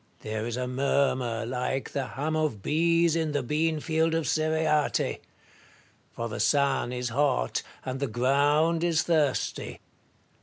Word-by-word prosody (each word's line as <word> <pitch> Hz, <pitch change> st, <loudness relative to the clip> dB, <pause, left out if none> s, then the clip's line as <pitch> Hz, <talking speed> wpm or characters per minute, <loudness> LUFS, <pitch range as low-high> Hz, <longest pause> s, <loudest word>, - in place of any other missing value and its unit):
Marius. -, -, -32 dB
There 110 Hz, +1 st, -2 dB
is 120 Hz, 0 st, -3 dB
a 125 Hz, 0 st, -2 dB
murmur 125 Hz, -3 st, 0 dB
like 125 Hz, +2 st, -2 dB
the 135 Hz, -2 st, -2 dB
hum 150 Hz, +6 st, -3 dB
of 150 Hz, -11 st, -1 dB
bees 165 Hz, +1 st, +2 dB
in 160 Hz, -2 st, -1 dB
the 145 Hz, -2 st, 0 dB
bean 155 Hz, +4 st, 0 dB
field 160 Hz, +1 st, +1 dB
of 165 Hz, -1 st, -1 dB
Cereate; 155 Hz, -1 st, +1 dB, 0.9 s
for 115 Hz, -, -4 dB
the 105 Hz, -, -6 dB
sun 140 Hz, -4 st, +2 dB
is 125 Hz, -1 st, -3 dB
hot, 125 Hz, -, +1 dB, 0.2 s
and 130 Hz, 0 st, -3 dB
the 140 Hz, -, -1 dB
ground 145 Hz, +7 st, +2 dB
is 170 Hz, -2 st, +2 dB
thirsty. 150 Hz, -6 st, 0 dB
145 Hz, 150 wpm, -27 LUFS, 125-160 Hz, 0.9 s, bees